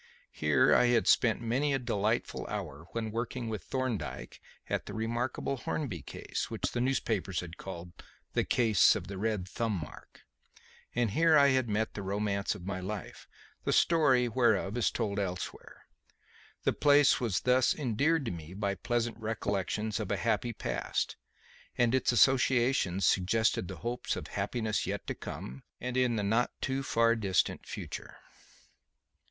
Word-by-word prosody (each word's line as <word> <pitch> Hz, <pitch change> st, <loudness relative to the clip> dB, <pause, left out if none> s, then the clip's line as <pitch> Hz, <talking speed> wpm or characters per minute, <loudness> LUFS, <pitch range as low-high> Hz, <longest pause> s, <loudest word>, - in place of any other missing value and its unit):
Here -, -, +3 dB
had 120 Hz, -2 st, +4 dB
I -, -, -17 dB
spent 115 Hz, -1 st, +3 dB
many 135 Hz, +5 st, +1 dB
a -, -, +2 dB
delightful 115 Hz, -3 st, -1 dB
hour 80 Hz, -7 st, -6 dB
when 110 Hz, -2 st, -3 dB
working 120 Hz, +1 st, -3 dB
with 110 Hz, -2 st, -4 dB
Thorndyke 110 Hz, -, -4 dB, 0.3 s
at -, -, -2 dB
the 100 Hz, -, -6 dB
remarkable 120 Hz, +4 st, -2 dB
Hornby 120 Hz, -, -3 dB
case, -, -, -5 dB
which -, -, -2 dB
the 120 Hz, -, -1 dB
newspapers 110 Hz, -7 st, 0 dB
had 85 Hz, -1 st, -9 dB
called 85 Hz, -2 st, -8 dB, 0.4 s
"The -, -, +2 dB
Case 110 Hz, -4 st, +4 dB
of 100 Hz, -5 st, -4 dB
the 95 Hz, +1 st, -7 dB
Red 105 Hz, -3 st, -1 dB
Thumb 115 Hz, +3 st, -2 dB
Mark"; 75 Hz, -, -11 dB, 0.7 s
and 120 Hz, -4 st, +1 dB
here 160 Hz, +6 st, +5 dB
had 130 Hz, -3 st, +4 dB
I -, -, -2 dB
met 110 Hz, +2 st, 0 dB
the 100 Hz, -, -5 dB
romance 100 Hz, +1 st, -1 dB
of 90 Hz, -4 st, -10 dB
my 95 Hz, -1 st, -3 dB
life, 95 Hz, +1 st, -6 dB, 0.4 s
the -, -, 0 dB
story 135 Hz, -7 st, +4 dB
whereof 110 Hz, -4 st, +2 dB
is 120 Hz, -, +2 dB
told 105 Hz, -3 st, -2 dB
elsewhere. 90 Hz, -2 st, -5 dB, 0.8 s
The -, -, +2 dB
place 145 Hz, -1 st, +5 dB
was 115 Hz, -7 st, 0 dB
thus 125 Hz, 0 st, +3 dB
endeared 145 Hz, +3 st, +1 dB
to -, -, -2 dB
me 85 Hz, +1 st, -8 dB
by 100 Hz, 0 st, -1 dB
pleasant 120 Hz, +2 st, -2 dB
recollections 105 Hz, -1 st, -2 dB
of -, -, -4 dB
a -, -, 0 dB
happy 120 Hz, -, 0 dB
past, -, -, -2 dB, 0.6 s
and 120 Hz, -1 st, +3 dB
its 130 Hz, -, +3 dB
associations 120 Hz, -6 st, +3 dB
suggested 95 Hz, +1 st, +2 dB
hopes 120 Hz, +1 st, -3 dB
of -, -, -6 dB
happiness 110 Hz, -3 st, -1 dB
yet -, -, -3 dB
to -, -, -3 dB
come 65 Hz, +2 st, -7 dB, 0.2 s
and 125 Hz, 0 st, -4 dB
in 125 Hz, -2 st, +2 dB
the 105 Hz, -, -1 dB
not 115 Hz, +5 st, +2 dB
too 135 Hz, 0 st, -1 dB
far 115 Hz, -3 st, +3 dB
distant 100 Hz, -6 st, 0 dB
future. -, -, -7 dB
115 Hz, 160 wpm, -31 LUFS, 100-125 Hz, 0.8 s, here